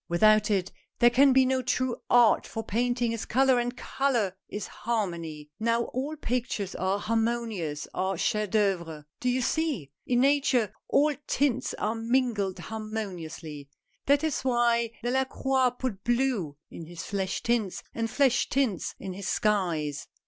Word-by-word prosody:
Without 215 +5 +4
it, 190 -3 0 0.3
there 240 0 +5
can 270 +3 +6
be 260 0 +5
no 260 0 +1
true 255 0 0
art, 240 -2 +5
for 225 - -5
painting 240 +2 0
is 230 -1 -3
color, 260 0 +3
and 245 +1 -2
color 235 -9 0
is 205 -1 -4
harmony. 170 -9 -4
Now 230 +1 +2
all 275 +5 -2
pictures 245 -8 -2
that - - -7
are 190 +1 +1
harmonious, 225 -8 -1
are 190 0 -1
chef 210 +4 0
d' - - -4
oeuvres 170 -7 0
— - - -64
do 250 - +1
you 255 +1 +1
see? 270 - -1 0.2
In 245 -1 +3
Nature, 265 -6 +2 0.2
all 300 +1 +4
tints 260 -2 0
are 215 - -1
mingled 225 -4 0
harmoniously. 180 -9 -6 0.4
That 285 +2 +4
is 315 -2 0
why 240 -2 +2
Delacroix 265 +1 +1
put 220 -7 -4
blue 240 - 0
in 165 - -9
his 170 -1 -7
flesh 195 -2 -2
tints, 230 -5 0
and 230 0 -2
flesh 260 -1 +2
tints 255 -10 0
in 190 -1 -5
his 195 0 -6
skies. 170 -10 0
225 Hz, 155 wpm, -28 LUFS, 190-255 Hz, 0.4 s, can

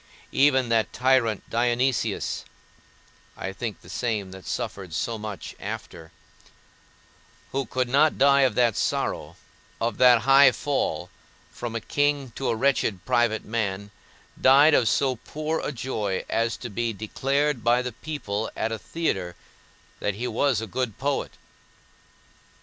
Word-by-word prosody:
Even 130 -3 +3
that 115 -1 +2
tyrant, 125 -5 +1
Dionysius 120 +1 0 0.9
(I 95 - -5
think 110 0 -5
the - - -17
same 105 -1 -2
that 95 0 -11
suffered 95 -5 -4
so 115 -2 -2
much 105 -2 -6
after), 80 -1 -7 1.4
who 135 -2 -2
could 130 +1 -1
not 145 +5 +3
die 140 0 +5
of 130 -2 +3
that 120 -4 +3
sorrow, - - -2 0.4
of 115 -2 -2
that 125 -2 +6
high 135 0 +7
fall, 90 - -2 0.4
from 120 -1 -6
a - - 0
king 145 +1 0
to 135 +3 -3
a - - +1
wretched 110 -7 0
private 120 -3 +1
man, 100 -3 -3 0.5
died 140 +4 +7
of 115 -6 +4
so 130 +1 +1
poor 155 +6 -3
a - - -3
joy 110 -7 -3
as 115 0 0
to 120 - -7
be 115 +2 -1
declared 135 +5 -1
by 120 +2 +3
the 125 - -3
people 115 -6 -4
at 115 - -1
a 110 - -3
theatre 95 - -2 0.6
that 105 - -1
he 120 +4 -3
was 120 0 +1
a - - -3
good 120 +1 -3
poet. 140 +1 -2
120 Hz, 145 wpm, -25 LUFS, 110-135 Hz, 1.4 s, high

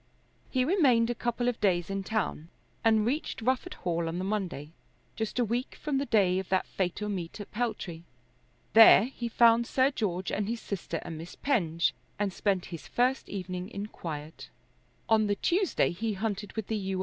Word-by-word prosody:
He 255 -1 +1
remained 260 - +4
a - - 0
couple 240 0 -2
of 245 - -1
days 180 -3 +1
in 195 0 -1
town 190 -6 -2 0.3
and 220 -2 +4
reached 280 +7 -2
Rufford 260 +9 -1
Hall 170 -2 -2
on 165 +1 -3
the 185 - -2
Monday, 185 -7 -3 0.4
just 220 +1 -3
a 245 - +3
week 240 +4 -2
from 290 -3 -1
the 280 - -2
day 190 -4 +3
of 190 - -6
that 190 -1 +2
fatal 190 +2 -2
meet 185 -1 -4
at 205 - -8
Peltry. 210 -8 -3 0.7
There 225 -2 +9
he 240 -1 -4
found 230 0 +5
Sir 265 +1 +3
George 190 -8 -2
and 205 -1 -1
his 235 0 -2
sister 170 -6 -4
and 160 -2 -6
Miss 165 +2 -9
Penge, 170 - +1 0.2
and 200 -2 -1
spent 195 -2 0
his 160 -5 -7
first 255 +2 +1
evening 185 -1 -5
in 200 -3 -5
quiet. 155 -3 -7 0.6
On 220 -1 +4
the 205 - +1
Tuesday 360 - +1
he 215 +5 -2
hunted 205 0 -3
with 220 -2 -3
the 220 - -2
U. 190 -2 -2
210 Hz, 185 wpm, -29 LUFS, 180-235 Hz, 0.7 s, There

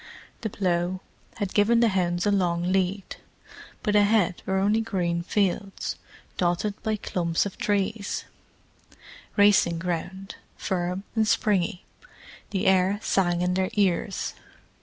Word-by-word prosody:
The 220 - -2
plough 180 -2 -1 0.4
had 200 -3 -3
given 225 +3 +4
the 235 -1 +4
hounds 175 -2 0
a 205 - +3
long 175 -2 +1
lead. 190 +1 -1 0.7
But 210 -1 +1
ahead 205 -3 +3
were 190 - +1
only 205 +3 +2
green 175 -6 -1
fields, 195 +1 -1 0.4
dotted 175 +4 0
by 220 0 0
clumps 170 -4 -1
of 200 - -5
trees: 205 0 -1 1.1
racing 205 -4 +5
ground, 180 +3 -4 0.2
firm 180 0 -2
and 220 -1 +2
springy. 190 -4 +1 0.6
The 200 +1 -2
air 190 +1 +3
sang 175 -2 +1
in 180 0 +1
their 185 0 0
ears. 195 -1 0
190 Hz, 125 wpm, -26 LUFS, 175-205 Hz, 1.1 s, racing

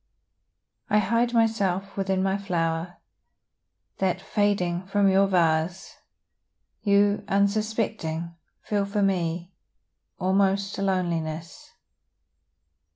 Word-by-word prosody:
I 210 - +3
hide 230 +4 +2
myself 200 -5 +1
within 190 -1 0
my 195 0 +1
flower, 170 -3 -2 1.0
That, 190 -2 +1
fading 185 -4 0
from 200 0 +2
your 195 +1 +4
vase, 175 0 0 0.8
You, 205 0 +3
unsuspecting, 200 -5 -1 0.3
feel 205 -1 0
for 200 +1 -1
me 175 -2 -1 0.6
Almost 195 +1 +1
a - - -2
loneliness. 170 -4 -2
195 Hz, 90 wpm, -25 LUFS, 175-200 Hz, 1.0 s, your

